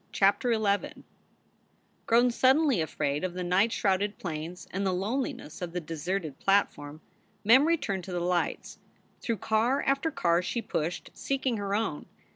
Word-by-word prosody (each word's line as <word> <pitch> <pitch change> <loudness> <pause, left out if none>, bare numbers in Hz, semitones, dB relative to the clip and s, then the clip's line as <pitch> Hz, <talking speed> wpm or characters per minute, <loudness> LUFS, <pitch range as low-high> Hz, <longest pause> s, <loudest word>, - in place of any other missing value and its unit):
CHAPTER 205 +5 +2
XI 205 -2 -1 1.1
ROWN 240 +2 +5
suddenly 265 - +3
afraid 145 -1 -2
of 180 -1 -3
the 180 - -3
night 185 +6 +2
shrouded 200 +1 0
plains 165 +1 -6
and 195 +2 -2
the 190 - +1
loneliness 215 - -3
of 175 -1 -5
the 180 - -1
deserted 165 -1 -4
platform, 155 -6 0 0.4
Mem 255 +8 +6
returned 215 - 0
to 190 - -7
the 175 - -1
lights. 175 0 -2 0.4
Through 230 -2 -1
car 225 +7 +1
after 275 +4 +1
car 170 - +1
she 235 - -2
pushed, 180 -7 -3
seeking 265 -3 -1
her 200 -1 -2
own. 210 -9 -2
195 Hz, 150 wpm, -28 LUFS, 175-235 Hz, 1.1 s, Mem